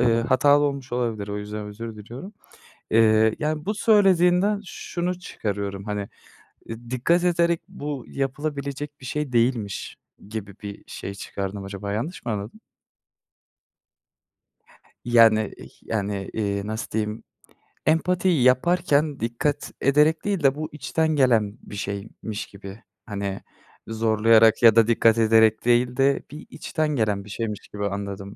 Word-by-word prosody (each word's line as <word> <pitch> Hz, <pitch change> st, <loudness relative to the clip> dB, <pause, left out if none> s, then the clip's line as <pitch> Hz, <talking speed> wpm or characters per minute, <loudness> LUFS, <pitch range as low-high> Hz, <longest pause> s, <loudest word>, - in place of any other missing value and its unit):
eee, 115 Hz, -1 st, +3 dB
hatalı 140 Hz, +5 st, +4 dB
olmuş 140 Hz, -3 st, -3 dB
olabilir. 115 Hz, -4 st, -2 dB
O 100 Hz, -, -3 dB
yüzden 105 Hz, 0 st, -6 dB
özür 110 Hz, +2 st, -7 dB
diliyorum. 120 Hz, -, -9 dB, 0.6 s
Eee, 110 Hz, 0 st, +4 dB
yani, 155 Hz, 0 st, -2 dB
bu 210 Hz, -, 0 dB
söylediğinden 195 Hz, -1 st, +4 dB
şunu 180 Hz, -1 st, -4 dB
çıkarıyorum, 100 Hz, -, -4 dB
hani, 105 Hz, -1 st, -4 dB, 0.6 s
iii, 115 Hz, +1 st, -9 dB
dikkat 150 Hz, +8 st, +2 dB
ederek 170 Hz, -1 st, +2 dB
bu 145 Hz, -3 st, -6 dB
yapılabilecek 140 Hz, +1 st, -4 dB
bir -, -, -10 dB
şey 150 Hz, +1 st, -3 dB
değilmiş 115 Hz, -4 st, 0 dB, 0.3 s
gibi 105 Hz, -3 st, -6 dB
bir 100 Hz, -1 st, -7 dB
şey 100 Hz, -, -6 dB
çıkardım. 100 Hz, 0 st, -5 dB
Acaba 100 Hz, +1 st, -5 dB
yanlış 140 Hz, -, -4 dB
mı 120 Hz, -, -1 dB
anladım? 105 Hz, +1 st, -5 dB, 2.5 s
Yani, 115 Hz, -3 st, +5 dB
iii, -, -, -12 dB
yani, 100 Hz, -2 st, -3 dB
iii, 100 Hz, -2 st, -2 dB
nasıl 110 Hz, +2 st, -4 dB
diyeyim? 105 Hz, 0 st, -2 dB, 0.6 s
Empatiyi 175 Hz, -1 st, +2 dB
yaparken 150 Hz, +2 st, +2 dB
dikkat 120 Hz, +6 st, -2 dB
ederek 150 Hz, +4 st, +3 dB
değil 200 Hz, -6 st, -1 dB
de 135 Hz, -1 st, +4 dB
bu 155 Hz, +1 st, -4 dB
içten 160 Hz, +1 st, -1 dB
gelen 115 Hz, -7 st, +2 dB
bir -, -, -10 dB
şeymiş 100 Hz, +2 st, -5 dB
gibi, 100 Hz, +2 st, -11 dB, 0.2 s
hani, 100 Hz, -3 st, -4 dB, 0.5 s
zorlayarak 110 Hz, 0 st, +4 dB
ya 115 Hz, -2 st, +8 dB
da 115 Hz, -1 st, +5 dB
dikkat 115 Hz, -1 st, +4 dB
ederek 110 Hz, -1 st, +4 dB
değil 120 Hz, +1 st, +2 dB
de 135 Hz, 0 st, +2 dB
bir 150 Hz, +1 st, -10 dB
içten 155 Hz, -1 st, -2 dB
gelen 105 Hz, -5 st, 0 dB
bir -, -, -12 dB
şeymiş 105 Hz, 0 st, -4 dB
gibi 105 Hz, 0 st, -3 dB
anladım. 100 Hz, 0 st, -5 dB
115 Hz, 135 wpm, -24 LUFS, 105-145 Hz, 2.5 s, ya